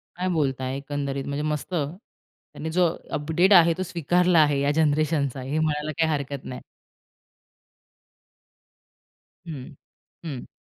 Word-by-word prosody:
काय 180 +1 -2
बोलताय? 135 -4 -1
एकंदरीत 140 -1 -3
म्हणजे 140 +1 -3
मस्त. 150 +4 -3
त्यांनी 160 - -6
जो 180 +1 +3 0.3
अपडेट 160 +6 +3
आहे 170 -2 +7
तो 185 - -1
स्वीकारला 175 0 +2
आहे 145 -2 +4
या 140 +1 +2
जनरेशनचा 150 -3 +1
हे 140 +4 -2
म्हणायला 155 -1 0
काही 160 - +3
हरकत 140 -2 -3
नाही. 125 - -6 2.9
हं. 145 -1 -7 0.5
हं. 140 -6 -6
150 Hz, 120 wpm, -25 LUFS, 140-165 Hz, 2.9 s, आहे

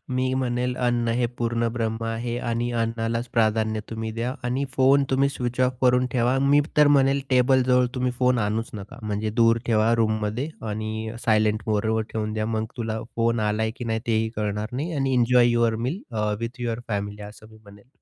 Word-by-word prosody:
मी 130 0 0
म्हणेल, 125 -1 -1
अन्न 120 -2 0
हे 120 0 +1
पूर्णब्रह्म 115 -1 -1
आहे 115 +1 -3
आणि 120 +1 -1
अन्नालाच 115 +1 -2
प्राधान्य 110 -1 +1
तुम्ही 110 0 -4
द्या 120 +3 -3
आणि 125 +3 0
फोन 135 +1 +4
तुम्ही 135 +1 +3
स्विच 125 -2 -3
ऑफ 125 0 +2
करून 125 0 +4
ठेवा. 125 +1 +2
मी 140 +2 +4 0.2
तर 150 -1 +6
म्हणेल, 135 0 +3
टेबल 130 0 +4
जवळ 125 0 +3
तुम्ही 125 -1 0
फोन 125 -1 +3
आणूच 110 +2 -1
नका. 105 +6 -9
म्हणजे 105 0 -2
दूर 115 0 +5
ठेवा 110 0 +3
रूममध्ये 110 +3 0 0.2
आणि 110 +1 -4
सायलेंट 110 -1 +2
मोडवर 110 +1 +1
ठेवून 110 -1 -2
द्या. 110 0 -2
मग 110 -1 -1
तुला 110 -1 -3 0.2
फोन 115 0 +1
आलाय 110 +1 0
की 125 - -6
नाही 110 -1 -1
तेही 110 -1 +1
कळणार 105 0 -2
नाही 150 +7 -3
आणि 135 -1 0
"enjoy 120 0 +4
your 120 -1 +2
meal 170 +10 -3 0.2
a 105 0 0
with 115 +2 -5
your 115 -1 -2
family," 105 -1 -3
असं 105 +1 -11
मी 110 - -16
म्हणेल. 100 +3 -17
115 Hz, 185 wpm, -24 LUFS, 110-125 Hz, 0.2 s, तर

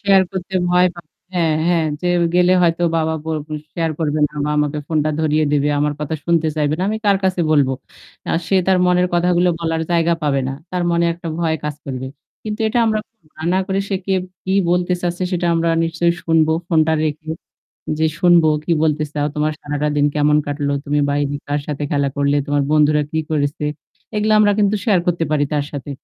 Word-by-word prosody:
Share 195 -1 +5
করতে 190 0 -5 0.2
ভয় 180 0 +5
পাবে। 170 -3 -14 0.2
হ্যাঁ, 165 -3 +2
হ্যাঁ, 170 -2 +2 0.2
যে 180 - -3 0.3
গেলে 180 0 +4
হয়তো 170 0 +2
বাবা 160 0 0
ব - - -15 0.5
শেয়ার 165 -1 -1
করবে 155 -2 0
না - - -28
বা 150 - -1
আমাকে 150 0 0
ফোনটা 155 -1 0
ধরিয়ে 155 0 +2
দিবে। 145 0 +2
আমার 150 0 +1
কথা 150 +1 -2
শুনতে 165 -2 +2
চাইবে 150 0 +1
না। - - -1
আমি 220 - -1
কার 200 - +5
কাছে 185 -1 +1
বলবো? 140 -4 +3 0.6
আ - - +2
সে 195 - +3
তার 190 -1 +4
মনের 180 0 +3
কথাগুলো 175 +1 +3
বলার 165 -1 -1
জায়গা 170 0 +2
পাবে 140 -2 +1
না। - - -3 0.2
তার 180 -1 -1
মনে 170 0 +2
একটা 170 0 -7
ভয় 160 -2 0
কাজ 150 -1 -2
করবে। 130 -1 -4 0.4
কিন্তু 215 +1 -4
এটা 240 +3 0
আমরা 215 -1 +1 0.6
না - - +3
করে 195 0 -1
সে 200 - -1
কে 195 - 0 0.3
কি 190 - -1 0.2
বলতে 180 0 +1
চাচ্ছে 175 +1 -2
সেটা 175 -1 0
আমরা 165 0 +1 0.2
নিশ্চয়ই 170 +1 +1
শুনবো 160 -1 +3 0.2
ফোনটা 160 -2 +3
রেখে। 155 +1 -4 0.7
যে 160 - +3
শুনবো 175 -2 +5 0.2
কি - - -1
বলতে 155 -1 +1
চাও, 145 -1 -1
তোমার 150 +1 +1
সারাটা 145 0 -2
দিন 145 - +3
কেমন 150 0 +3
কাটলো, 145 0 -2
তুমি 145 0 0
বাইরে 145 0 0
কার 145 +1 0
সাথে 150 -1 -3
খেলা 140 -2 +1
করলে, 140 0 +2
তোমার 145 0 +1
বন্ধুরা 150 0 +4
কি 160 - 0
করেছে? 145 -1 -1 0.5
এগুলা 215 +1 +2
আমরা 205 -1 +5
কিন্তু 205 0 +3
শেয়ার 200 -5 +4
করতে 170 -1 +1
পারি 150 -1 +2
তার 145 -1 0
সাথে। 145 -1 -6
160 Hz, 200 wpm, -19 LUFS, 150-180 Hz, 0.7 s, শেয়ার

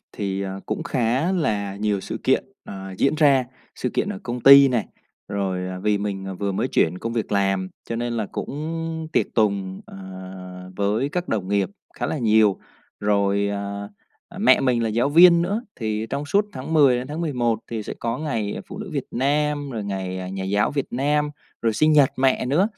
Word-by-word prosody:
thì, 100 -1 -3
ờ, 95 0 -5
cũng 110 - -2
khá 130 +7 0
là 105 - -1
nhiều 105 -1 0
sự - - -5
kiện, - - +3 0.2
ờ, 95 -1 -8
diễn 140 - +3
ra, 140 -4 +4 0.3
sự 125 - -3
kiện - - -1
ở 205 -1 -4
công 120 -4 -4
ty 140 +2 +9
này, 120 -4 0 0.4
rồi, 95 -2 -2
à, 90 0 -5
vì 105 +1 +1
mình 95 -2 -4
vừa 100 0 -2
mới 95 - -1
chuyển 90 +3 +1
công 115 +3 -4
việc 115 -3 -2
làm, 95 -2 +1 0.2
cho 115 - -2
nên 120 0 -2
là 110 -3 -2
cũng 160 +2 -4
tiệc - - +2
tùng, 100 -4 0
ờ, - - -11 0.8
với 105 +7 +1
các 175 +4 -3
đồng 95 -4 -1
nghiệp 100 - +1 0.2
khá - - -2
là 155 - -2
nhiều. 110 -4 +4 0.4
Rồi, 100 0 +2
à, 100 0 -4 0.5
mẹ - - +5
mình 125 -3 +2
là 115 - +1
giáo 120 +5 +1
viên 170 +2 +7
nữa 205 +6 -1
thì 110 -1 -2
trong 145 - -2
suốt 200 +7 +2
tháng 130 +5 -6
10 140 -5 +6
đến 125 +1 -4
tháng 150 +3 -5
11 125 -8 0
thì 115 -2 -3
sẽ - - -6
có 115 +2 -2
ngày 115 -9 -2
phụ 195 - -8
nữ 210 -3 -6
Việt 140 -3 -2
Nam, 145 +2 0
rồi 110 -5 -4
ngày, 95 -2 -3
à, 90 - -5
nhà 95 0 -4
giáo 100 +2 +1
Việt 140 -2 -2
Nam, 145 +3 +1 0.3
rồi 115 -1 +2
sinh 155 +7 +3
nhật 145 -3 +5
mẹ 130 -1 +2
nữa. 170 - +3
115 Hz, 205 wpm, -23 LUFS, 100-145 Hz, 0.8 s, ty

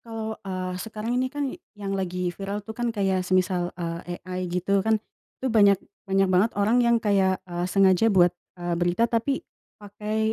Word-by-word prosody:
kalau, 225 -1 -5
eee, 185 -1 -4
sekarang 220 +2 -4
ini 260 - 0
kan 290 +1 -3 0.3
yang 200 -1 -4
lagi 180 -2 -2
viral 200 +2 -5
tuh 220 - -6
kan 240 +1 -2
kayak 195 -4 +1
semisal, 185 -1 +1
eee, 170 0 -4
AI 185 -1 -4
gitu 185 +3 +1
kan 220 +2 +2 0.4
itu 260 - -3
banyak 200 -3 +6 0.3
banyak 195 0 +3
banget 195 +5 +4
orang 220 +5 +3
yang 235 -1 +4
kayak, 190 -2 +3
eee, 175 0 -3
sengaja 195 +2 +4
buat, 180 -3 +5 0.2
eee, 175 -1 -2
berita 175 +6 +2
tapi 250 +4 0 0.3
pakai, 215 +2 -2
195 Hz, 175 wpm, -25 LUFS, 180-220 Hz, 0.4 s, banyak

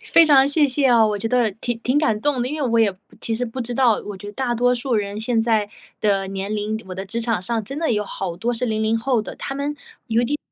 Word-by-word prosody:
非 335 - +8
常 280 -3 +6
谢 290 0 +3
谢 275 +1 +1
哦， 230 -2 +5
我 210 -1 -1
觉 225 - -3
得 240 -2 +2
挺 225 +3 -3
挺 255 +5 +1
感 225 -8 +1
动 285 -2 +1
的。 250 - -1
因 300 +1 -4
为 255 - +1
我 230 0 +2
也 220 -3 +4
不 185 - -24 0.2
其 225 - -1
实 245 - -1
不 245 +2 -6
知 240 0 -3
道 240 -4 +3
我 205 -2 -6
觉 205 - -10
得 205 - -7
大 245 0 -1
多 245 +1 +3
数 245 +1 -1
人 205 -1 -1
现 225 0 +1
在 220 -3 +1 0.3
的 195 -2 +1
年 195 +2 -3
龄， 215 +1 -2
我 185 - -5
的 190 +1 -5
职 230 +4 -4
场 225 -5 0
上 225 +4 -2
真 275 +7 -6
的 325 -4 0
有 210 -1 0
好 180 -3 -5
多 240 +4 -1
是 245 +2 -1
零 220 -1 -1
零 225 +1 +1
后 240 -1 +1
的。 - - -8
他 270 - -5
们 285 +1 -2 0.3
有 230 +1 +2
一 - - +1
点 295 +4 -1
230 Hz, 315 characters per minute, -22 LUFS, 210-255 Hz, 0.3 s, 非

